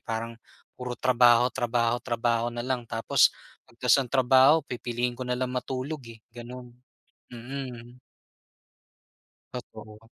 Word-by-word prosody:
Parang, 115 +1 -5 0.3
puro 125 -1 -6
trabaho, 120 -1 +4
trabaho, 120 -1 0
trabaho 120 -1 0
na 120 0 -5
lang, 125 -3 -3
tapos 115 0 +3 0.4
pag 115 - -23
tapos 125 +2 +4
ng 130 - -4
trabaho 130 +4 +5
pipiliin 120 0 -3
ko 125 - -13
na 125 -1 -2
lang 125 0 -2
matulog, 130 +4 -4
eh, 115 - -10 0.2
gano'n. 120 +1 -10 0.6
Mm. 120 -1 -8 1.6
Totoo. 110 -3 -9
120 Hz, 125 wpm, -27 LUFS, 115-125 Hz, 1.6 s, trabaho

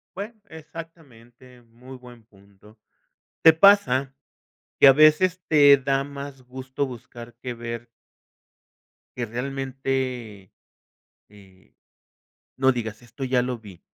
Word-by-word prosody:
Bueno, 210 +4 -7
exactamente, 135 -7 -13
muy 120 +3 -14
buen 120 -2 -15
punto, 100 0 -22 0.6
¿te 160 - +8
pasa 150 -8 +4 0.6
que - - +7
a 135 - +10
veces 155 +5 +4
te 145 -2 +7
da 135 0 -1
más 140 -1 -9
gusto 130 +2 -5
buscar 120 -1 -11
que 125 +1 -7
ver? 115 0 -7 1.3
Que 120 - -2
realmente, 130 -4 -4 0.8
eh, 95 -2 -21 0.8
no 130 0 +3
digas: 110 -2 -6
"Esto 120 +3 -8
ya 125 -1 +1
lo 125 -1 -4
vi". 100 -6 -15
130 Hz, 110 wpm, -24 LUFS, 115-140 Hz, 1.3 s, a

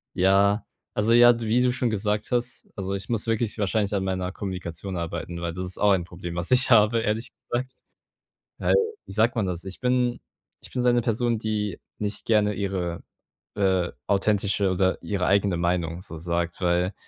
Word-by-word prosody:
Ja, 100 +2 +3 0.3
also 105 +2 +1
ja, 120 0 +7
wie 115 +2 +2
du 125 - +3
schon 125 -1 0
gesagt 105 0 -1
hast 120 0 -2
also 95 -1 -3
ich 100 - -5
muss 115 -3 0
wirklich 115 -1 -1
wahrscheinlich 105 0 0
an 95 - 0
meiner 95 -1 -2
Kommunikation 95 -1 -5
arbeiten, 85 0 -4
weil 85 -1 -3
das 90 - -3
ist 90 0 -5
auch 105 - +4
ein 95 -3 +2
Problem, 85 0 -7
was 85 +5 +1
ich 125 +1 +6
habe 115 -1 +5
ehrlich 110 +1 -2
gesagt. 130 +2 -4 0.9
Halt, - - +2 0.3
wie - - -10
sagt 110 +4 +2
man 105 - +1
das? 90 -2 -3
Ich 95 -1 -8
bin 125 -1 +1 0.4
ich - - -11
bin 125 - -1
so 125 - +4
eine 120 0 +3
Person, 115 0 0
die 105 -4 -2 0.2
nicht 105 0 -3
gerne 105 -2 +3
ihre, 95 -4 -3 0.6
äh, 95 -3 +2 0.2
authentische 100 -1 +1
oder 95 0 +1
ihre 95 -3 -1
eigene 100 -2 +2
Meinung 85 -1 -1
so 90 -3 -9
sagt, 85 +1 -2
weil 90 +1 +1
100 Hz, 185 wpm, -25 LUFS, 90-115 Hz, 0.9 s, ja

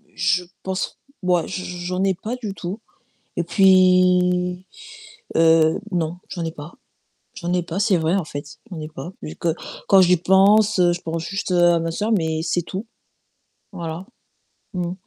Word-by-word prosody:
je 180 0 +1 0.2
pense 190 0 -3 0.2
ouais, 180 -2 +2
j 190 -1 -5 0.2
j'en 180 +1 -1
ai 195 -1 +2
pas 215 +7 -5
du 215 -5 -5
tout 190 +3 -6 0.6
et 175 - +1
puis, 180 0 +4 0.7
heu, 160 0 +4
non, 170 -1 -1
j'en 175 - -4
ai 165 - -3
pas. 150 +1 -10 0.6
J'en 175 -2 -4
ai 180 0 +1
pas, 170 +2 -5
c'est 205 -2 +3
vrai 165 +3 +1
en 190 - -1
fait, 145 -1 -8
j'en 170 -4 -6
ai 155 - -6
pas 155 +3 -8
vu 155 - -7
que 165 -2 -1 0.3
quand 195 - +7
j'y 180 0 +5
pense, 200 +4 +4
je 175 -1 +3
pense 165 0 -4
juste 195 0 -3
à 175 -1 +4
ma 165 0 -2
soeur, 210 +6 -1
mais 160 -5 0
c'est 175 +1 0
tout. 190 +6 -6 0.9
Voilà. 170 +2 -6 0.7
Mmh. 180 -1 -2
180 Hz, 165 wpm, -22 LUFS, 165-190 Hz, 0.9 s, quand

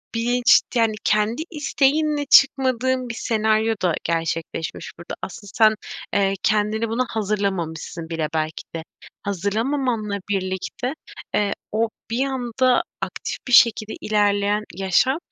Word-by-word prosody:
bilinç, 245 +2 +4
yani, 225 -2 +3
kendi 215 +7 +1
isteğinle 295 0 +1
çıkmadığın 260 -2 +3
bir - - -3
senaryo 220 0 +1
da 180 -3 +2
gerçekleşmiş 165 -1 -3
burada. 170 - -8
Asıl 200 +2 -7
sen, 220 -2 +5 0.4
eee, 195 -1 +2
kendini 215 +1 +1
buna 240 +3 0
hazırlamamışsın 190 -6 -3
bile 165 -2 -1
belki 155 0 -2
de. 165 - -4 0.4
Hazırlamamanla 215 +3 -1
birlikte, 190 +6 -2 0.4
eee, 205 -1 +1 0.2
o 225 +1 +1 0.2
bir 250 +4 +1
anda 255 -1 +1 0.2
aktif - - -4
bir 250 - -2
şekilde 220 -2 +5
ilerleyen 205 0 +1
yaşam, 195 - +2
215 Hz, 120 wpm, -22 LUFS, 195-250 Hz, 0.4 s, sen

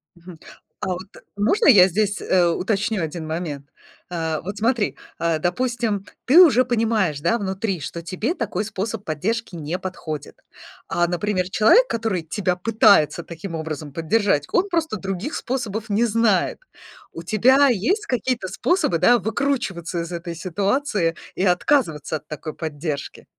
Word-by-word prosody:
Мгм. 170 -1 -13 0.4
А - - -2
вот 185 +1 -4 0.3
можно 380 - +2
я 200 -10 +8
здесь, 205 +2 0
э, 180 -2 +3
уточню 200 +3 -1
один 160 0 -4
момент? 155 -3 -5 0.4
А, 160 -3 -2
вот 200 +4 -6
смотри, 225 0 0 0.2
а, 165 -1 0
допустим, 210 +3 -1 0.2
ты 305 +8 +8
уже 265 -8 +6
понимаешь, 220 - 0
да, 200 +9 +2
внутри, 195 -2 -2
что 155 +4 -6
тебе 185 - -2
такой 210 - -2
способ 210 0 -4
поддержки 190 +7 -2
не 165 +2 -4
подходит. 155 -6 -6 0.5
А, 175 0 +1
например, 185 +1 -1
человек, 325 - +5
который 220 -6 -1
тебя 180 +2 -2
пытается 200 -5 +4
таким 170 +2 -7
образом 155 -2 -5
поддержать, 165 -2 +1
он 365 +2 +2
просто 320 - -1
других 195 - -4
способов 225 -4 -3
не 210 +3 +2
знает. 220 -4 +1 0.5
У 165 - -7
тебя 255 +9 +4
есть 255 - 0
какие-то 245 - -1
способы, 345 - +1
да, 240 +8 +5
выкручиваться 215 -7 -2
из 170 +1 -6
этой 170 0 -5
ситуации 195 - 0 0.2
и - - -1
отказываться 180 - +1
от - - -19
такой 155 0 -6
поддержки? 150 -2 -5
190 Hz, 145 wpm, -22 LUFS, 170-230 Hz, 0.5 s, я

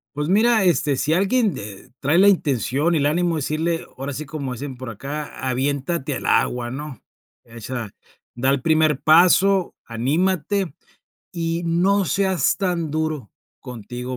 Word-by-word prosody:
Pues 150 +2 -2
mira, 220 +2 +4
este, 150 -5 +2
si 150 +4 0
alguien 205 +3 +2
de 100 -1 -9
trae 150 +5 +2
la 200 - +6
intención 145 - +1
y 160 - +2
el 140 - +2
ánimo 170 +1 +1
decirle, 160 +3 -1
ahora 135 +2 -4
sí, 150 +2 -6
como 135 -3 -5
dicen 130 +1 -7
por 130 -2 -6
acá: 145 +7 -6
"Aviéntate 140 +3 -1
al - - -5
agua", 125 -1 +1
¿no? 135 -1 -7 0.4
Echa 115 0 -6 0.5
da 130 +3 +1
el 140 -2 0
primer 155 -2 +2
paso, 180 +4 +4
anímate, 165 - -1 0.6
y 165 -1 -2
no 185 +4 +2
seas 190 -5 +1
tan 175 -5 -1
duro 155 - -3 0.3
contigo 125 +2 -7
150 Hz, 150 wpm, -22 LUFS, 130-175 Hz, 0.6 s, la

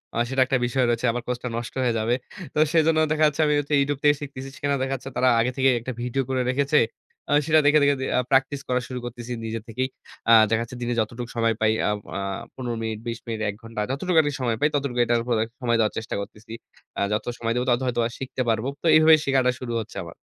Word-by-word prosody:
আ - - -2
সেটা 135 0 +1
একটা 130 0 +1
বিষয় 130 +1 +1
রয়েছে। 120 +1 0
আমার 120 +1 -3
কোর্সটা 125 0 -3
নষ্ট 120 - -5
হয়ে 120 -2 +2
যাবে। 115 +2 +1 0.4
তো - - -6 0.2
সেজন্য 160 -1 +4
দেখা 155 0 +2
যাচ্ছে 150 +2 -1
আমি 150 - +2
হচ্ছে 145 +1 -3
YouTube 140 0 -1
থেকে 145 0 +5
শিখতেছি। 135 -1 -7
সেখানে 145 -1 -1
দেখা 135 0 -2
যাচ্ছে 135 +1 -8
তারা 130 - +4
আগে 125 +2 +1
থেকে 135 0 +4
একটা 130 +3 -5
ভিডিও 125 +2 -1
করে 130 -1 0
রেখেছে। 140 +3 +2 0.5
আ - - +4
সেটা 155 -1 +5
দেখে, 150 +1 +6
দেখে 140 0 +4 0.2
আ - - +4
প্র্যাকটিস 135 +1 +2
করা 125 0 +1
শুরু 125 -1 -5
করতেছি 120 0 -7
নিজে 110 0 -3
থেকেই। 130 +4 -2 0.4
আ - - +7 0.2
দেখা 115 0 +1
যাচ্ছে 120 +1 -9
দিনে 120 0 -1
যতটুকু 115 +2 -3
সময় 115 -1 +2
পাই 110 0 +4 0.2
আব 105 - 0 0.2
আ - - -2 0.4
১৫ 120 -2 -4
মিনিট, 110 -1 -3
২০ 115 0 -3
মিনিট, 115 -2 -4
১ 100 - -5
ঘন্টা। 115 -2 -5
যতটুকু 165 +5 -1
আমি 145 - -1
সময় 120 -3 0
পাই, 150 - +5
ততটুকু 140 -4 -1
এটার 120 0 +2
উপরে 120 -3 0 0.2
সময় 120 -1 +1
দেওয়ার 110 -1 +2
চেষ্টা 110 - -4
করতেছি। 105 +2 -11 0.5
আ - - 0
যত 105 - -1
সময় 115 0 -1
দেব, 125 - +1
তত 120 0 +3
হয়তোবা 120 -2 0
শিখতে 130 0 -4
পারবো। 115 +3 0
তো - - -9
এইভাবে 155 0 +8
শেখাটা 130 -2 +3
শুরু 120 -2 -5
হচ্ছে - - -10
আমার। - - -10
125 Hz, 235 wpm, -24 LUFS, 115-140 Hz, 0.5 s, এইভাবে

